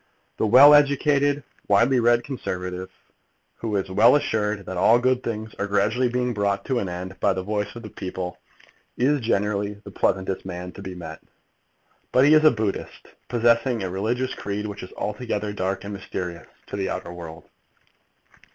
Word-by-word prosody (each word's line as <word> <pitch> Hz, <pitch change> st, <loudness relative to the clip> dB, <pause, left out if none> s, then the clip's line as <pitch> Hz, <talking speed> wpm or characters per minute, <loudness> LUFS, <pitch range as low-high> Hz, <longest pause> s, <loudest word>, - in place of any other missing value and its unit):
The 110 Hz, -, +2 dB
well 135 Hz, +7 st, +9 dB
educated, 145 Hz, 0 st, +3 dB, 0.2 s
widely 115 Hz, +6 st, +4 dB
read 120 Hz, 0 st, +3 dB
Conservative, 90 Hz, -8 st, -5 dB, 0.7 s
who 110 Hz, -2 st, -3 dB
is 95 Hz, -1 st, -2 dB
well 115 Hz, +7 st, +6 dB
assured 105 Hz, -7 st, -1 dB
that 95 Hz, -, -5 dB
all 110 Hz, +6 st, +5 dB
good 130 Hz, +1 st, +1 dB
things 110 Hz, -2 st, -5 dB
are 100 Hz, -, -1 dB
gradually 110 Hz, +5 st, +1 dB
being 125 Hz, 0 st, -1 dB
brought 100 Hz, -2 st, -1 dB
to 130 Hz, -3 st, 0 dB
an 95 Hz, -, -3 dB
end 90 Hz, +2 st, -7 dB
by -, -, +2 dB
the 95 Hz, -, -4 dB
voice 105 Hz, +2 st, -3 dB
of 120 Hz, -, -9 dB
the 105 Hz, -, -9 dB
people, 90 Hz, -1 st, -6 dB, 0.6 s
is 140 Hz, +4 st, +2 dB
generally 105 Hz, -2 st, 0 dB
the 100 Hz, -, -10 dB
pleasantest 95 Hz, 0 st, -1 dB
man 90 Hz, -1 st, -6 dB
to 100 Hz, -, -11 dB
be 95 Hz, -2 st, -7 dB
met. 80 Hz, -2 st, -8 dB, 0.9 s
But 130 Hz, +2 st, +5 dB
he 150 Hz, -, +6 dB
is 155 Hz, 0 st, +6 dB
a 155 Hz, -, +8 dB
Buddhist, 110 Hz, -6 st, -4 dB, 0.2 s
possessing 120 Hz, -1 st, +2 dB
a 95 Hz, -, -3 dB
religious 120 Hz, +7 st, -1 dB
creed 105 Hz, +1 st, -4 dB
which 105 Hz, -1 st, -6 dB
is 90 Hz, -, -9 dB
altogether 105 Hz, -1 st, -3 dB
dark 95 Hz, -1 st, -2 dB
and 100 Hz, +1 st, -6 dB
mysterious 90 Hz, -3 st, -6 dB, 0.2 s
to -, -, -7 dB
the 95 Hz, -1 st, -2 dB
outer 85 Hz, -, -5 dB
world. 85 Hz, -2 st, -9 dB
105 Hz, 175 wpm, -24 LUFS, 95-125 Hz, 0.9 s, well